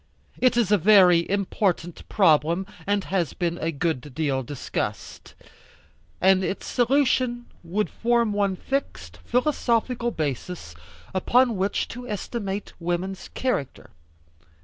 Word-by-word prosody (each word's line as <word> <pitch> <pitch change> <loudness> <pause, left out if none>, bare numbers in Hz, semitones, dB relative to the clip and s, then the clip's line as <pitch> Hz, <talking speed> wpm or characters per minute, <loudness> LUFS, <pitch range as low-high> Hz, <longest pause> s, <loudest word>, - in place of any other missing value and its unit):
It 250 -1 +3
is 225 -4 +2
a 210 - +5
very 180 -3 +6
important 190 -3 -1
problem, 170 -1 +3 0.2
and 200 -1 +1
has 180 -7 -1
been 175 -1 -2
a 165 - -1
good 150 -4 -3
deal 140 -4 0
discussed, 130 +1 -5 0.8
and 190 0 +4
its 190 - -3
solution 250 -1 +1 0.2
would 195 +5 -1
form 235 -2 +1
one 200 -2 +1
fixed, 85 - -4
philosophical 245 - 0
basis, 155 - -4 0.4
upon 240 +5 +3
which 195 +1 -1
to 245 +1 -8
estimate 205 -1 -4
woman's 175 +2 -3
character. 250 - -2
195 Hz, 115 wpm, -25 LUFS, 170-235 Hz, 0.8 s, very